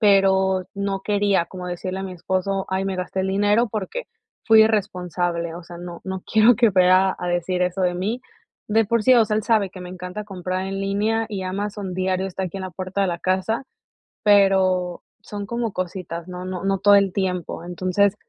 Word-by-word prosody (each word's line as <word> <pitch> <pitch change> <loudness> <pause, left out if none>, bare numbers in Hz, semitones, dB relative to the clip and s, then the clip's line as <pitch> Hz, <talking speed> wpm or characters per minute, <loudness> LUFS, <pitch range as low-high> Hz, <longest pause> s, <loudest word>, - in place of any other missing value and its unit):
pero 190 -2 +4
no 200 -1 -2
quería 200 -3 +1
como 180 0 -8
decirle 185 +2 -4
a 195 - -4
mi 185 - -6
esposo: 190 +2 -2
"Ay 190 +1 -1
me 190 -1 -2
gasté 185 +1 -3
el 190 - -1
dinero 205 +4 +2
porque 215 - -4 0.4
fui 220 -1 +7
irresponsable". 180 -5 -1
O 175 - -8
sea, 170 0 -10
no 175 -1 -8
no 190 -1 -4
quiero 220 +2 +6
que 235 -1 +5
vea 185 0 +4
a 180 - -3
decir 175 +1 0
eso 180 +1 -1
de 180 -1 +1
mí. 205 +7 -2 0.5
De 220 +1 +3
por 230 0 +1
sí, 255 - +6
o 230 -2 +6
sea, 210 0 -1
él 215 - -2
sabe 215 -5 +2
que 185 - -10
me 180 - -7
encanta 180 +3 -6
comprar 185 -1 -4
en 195 0 -3
línea, 210 +3 0
y 195 -2 -3
Amazon 200 0 -4
diario 185 0 0
está 190 0 -5
aquí 185 +1 -5
en 190 - -5
la 185 - -5
puerta 185 +3 -4
de - - +2
la 170 -1 -2
casa, 190 +7 -1 0.6
pero 190 -3 +3 0.2
son 205 -1 -6
como 235 -3 -2
cositas, 175 -2 -5
no 180 0 -7
no 185 -1 -5
no 195 0 +2
todo 205 +1 +5
el 200 -2 +4
tiempo. 180 -4 -2
Entonces, 185 +3 +1
190 Hz, 205 wpm, -22 LUFS, 180-205 Hz, 0.6 s, fui